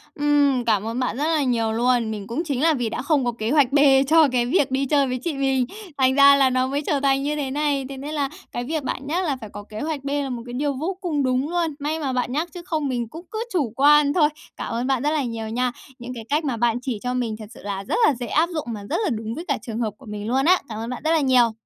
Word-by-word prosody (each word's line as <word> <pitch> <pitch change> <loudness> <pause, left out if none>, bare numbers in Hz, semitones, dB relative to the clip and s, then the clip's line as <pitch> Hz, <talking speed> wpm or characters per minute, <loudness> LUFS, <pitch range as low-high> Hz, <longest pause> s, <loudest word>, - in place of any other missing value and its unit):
Ừm, 285 -4 +2
cảm 215 -1 +1
ơn 235 +3 -3
bạn 250 -1 -1
rất 290 - -1
là 315 -3 +2
nhiều 230 -3 +1
luôn. 235 -1 +1
Mình 205 -2 -6
cũng 280 +10 -2
chính 280 -5 -2
là 325 0 +4
vì 245 -5 -1
đã 220 - -4
không 285 -2 +1
có 240 - +1
kế 225 0 -3
hoạch 280 -4 +4
B 285 - +3 0.3
cho 320 0 +6
cái 240 -1 +1
việc 270 -1 +1
đi 270 +1 +1
chơi 280 0 +2
với 255 0 -2
chị 335 - -1
mình. 270 -2 +1 0.3
Thành 260 0 +3
ra 280 0 +8
là 270 -2 +4
nó 255 0 +1
mới 280 +2 -1
trở 290 -1 0
thành 275 0 +2
như 300 +1 -1
thế 275 -3 -3
này, 285 -1 0
thế 275 - -7
nên 290 +3 -6
là 285 -3 -1 0.2
cái 240 - -3
việc 300 +2 -3
bạn 275 +1 -4
nhắc 350 +5 0
là 285 -5 0
phải 215 - -8
có 205 0 -9
kế 215 +1 -9
hoạch 300 -2 -3
B 280 - -4
là 285 -1 -1
một 235 -2 -5
cái 245 - -8
điều 280 +2 -1
vô 340 +8 -3
cùng 305 -7 -1
đúng 255 +3 0
luôn. 340 -3 0
May 305 +3 -2
mà 275 -4 -2
bạn 250 -1 -1
nhắc 315 +5 -1
chứ 355 - -7
không 310 -5 -1
mình 240 -3 -2
cũng 325 +9 -10
cứ 440 +1 -2
chủ 275 - 0
quan 290 +1 +5
thôi. 300 -3 +4 0.3
Cảm - - -4
ơn 240 +3 -1
bạn 265 -2 +1
rất 295 - +2
là 300 -3 0
nhiều 225 -2 -4
nha. 250 +2 0 0.3
Những 245 +1 -7
cái 230 -3 -7
cách 300 +3 +1
mà 250 -5 -1
bạn 235 0 +2
chỉ 250 -5 -3
cho 250 0 -1
mình 240 -4 -1
thật 215 - -7
sự - - -13
là 200 -1 -4
rất - - -2
là - - +4
dễ 240 0 -5
áp 320 +7 +2
dụng 310 -2 -3
mà 205 -1 -7
rất - - 0
là 380 - +1
đúng 225 0 -3
với 340 - -6
cả 280 - +1
trường 230 -2 -5
hợp 220 -3 -1
của - - -16
mình 210 0 -6
luôn 265 +4 +1
á. 365 +2 +6
Cảm 215 - -5
ơn 230 - -4
bạn 250 - -6
rất 320 - +3
là 325 - +4
nhiều. 250 -4 +4
270 Hz, 310 wpm, -23 LUFS, 240-295 Hz, 0.3 s, ra